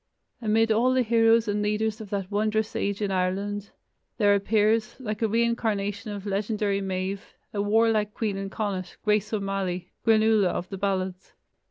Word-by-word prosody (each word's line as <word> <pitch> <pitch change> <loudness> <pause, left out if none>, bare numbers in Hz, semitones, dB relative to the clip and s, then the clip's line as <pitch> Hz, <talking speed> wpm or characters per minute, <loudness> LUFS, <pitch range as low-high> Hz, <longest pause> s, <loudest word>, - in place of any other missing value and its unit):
Amid 225 0 +2
all 245 +4 +3
the 255 - +3
heroes 225 0 +4
and 205 0 0
leaders 210 +1 -1
of 210 - -9
that 195 -1 -3
wondrous 215 +1 0
age 200 +1 -1
in 200 - -1
Ireland, 195 +2 -1 0.5
there 205 -3 +4
appears, 215 +2 +2
like 215 -4 -4
a 225 - +3
reincarnation 220 -2 0
of 200 -1 -6
legendary 205 0 -1
Medb, 190 +1 -2 0.3
a 205 - 0
warlike 215 0 +2
queen 215 -3 -1
in 195 0 -4
Connacht, 195 -3 -4
Grace 210 0 +1
O'Malley, 195 -4 -2
"Granuaile" 220 -2 +4
of 175 0 -2
the 195 - -5
ballads. 190 -2 -2
210 Hz, 160 wpm, -26 LUFS, 195-220 Hz, 0.5 s, heroes